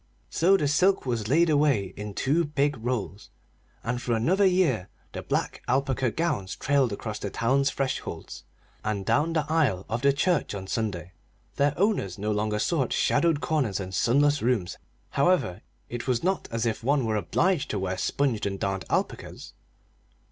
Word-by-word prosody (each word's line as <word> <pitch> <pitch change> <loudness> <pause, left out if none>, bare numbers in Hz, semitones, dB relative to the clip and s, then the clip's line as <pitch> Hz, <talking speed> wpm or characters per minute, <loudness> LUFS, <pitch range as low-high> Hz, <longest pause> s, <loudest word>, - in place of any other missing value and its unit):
So 190 +4 +4
the 150 - 0
silk 185 +6 +2
was 115 -4 -2
laid 165 +8 +4
away 145 - +2
in 105 0 -7
two 150 +6 +2
big 145 -1 0
rolls, 115 -4 -3 0.5
and 120 +1 -2
for 120 - -1
another 185 - +3
year 160 - +1 0.2
the - - -6
old - - -11
black - - -1
alpaca 130 0 +1
gowns 110 - -2
trailed 140 -4 +1
across 105 +1 -5
the 100 - -4
town's 135 +6 +1
thresholds 135 -2 -4 0.4
and 105 -3 -2
down 155 - +2
the 155 -2 +1
aisle 140 - +1
of 115 +2 -2
the 140 +1 +5
church 145 - 0
on 95 -1 -6
Sunday. 95 -5 -3 0.5
Their 145 +1 +2
owners 190 - 0
no 105 +2 -2
longer 105 0 0
sought 135 +2 0
shadowed 165 -4 +2
corners 125 -8 0
and 95 -1 -6
sunless 145 +8 +3
rooms, 115 -7 0 0.3
however; 140 - +1 0.3
it 120 +2 -6
was 125 -3 0
not 190 +1 0
as 115 0 -1
if 115 -1 -2
one 135 0 +2
were 110 -1 0
obliged 170 - +1
to 105 - -1
wear 95 -1 -2
sponged 125 -1 0
and 100 -1 -4
darned 95 -1 -2
alpacas! - - -3
125 Hz, 170 wpm, -26 LUFS, 105-150 Hz, 0.5 s, the